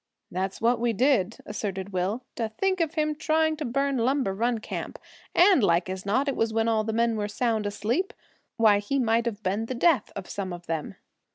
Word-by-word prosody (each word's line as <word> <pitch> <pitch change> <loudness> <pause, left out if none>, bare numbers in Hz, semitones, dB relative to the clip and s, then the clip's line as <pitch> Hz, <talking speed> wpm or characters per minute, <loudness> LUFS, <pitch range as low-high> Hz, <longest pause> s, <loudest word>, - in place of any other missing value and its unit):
"That's 190 +1 -3
what 235 +2 +2
we 235 0 +1
did," 230 -4 +2
asserted 200 -2 -4
Will. 190 +7 -1
"To 225 -3 -2
think 375 - 0
of 325 -1 -1
him 305 -1 +1
trying 315 +1 +1
to 305 - -4
burn 275 +2 0
Lumber 255 -3 +1
Run 235 +4 0
Camp; 215 - -6 0.4
and 365 -1 +6
as - - 0
like 175 0 +2
as 190 +1 -6
not 260 +8 +2
it 275 - 0
was 225 0 0
when 225 0 +1
all 220 -1 +2
the 220 - -2
men 230 0 +1
were 205 -1 -1
sound 220 0 0
asleep! 225 - -1 0.5
Why, 215 -3 +5
he 205 +7 -2
might 230 -2 +2
have 215 -2 -4
been 200 +4 -1
the 255 - -3
death 265 -3 +2
of 195 -3 -6
some 190 -3 -4
of 175 0 -9
them!" 160 -2 -3
225 Hz, 215 wpm, -26 LUFS, 205-265 Hz, 0.5 s, and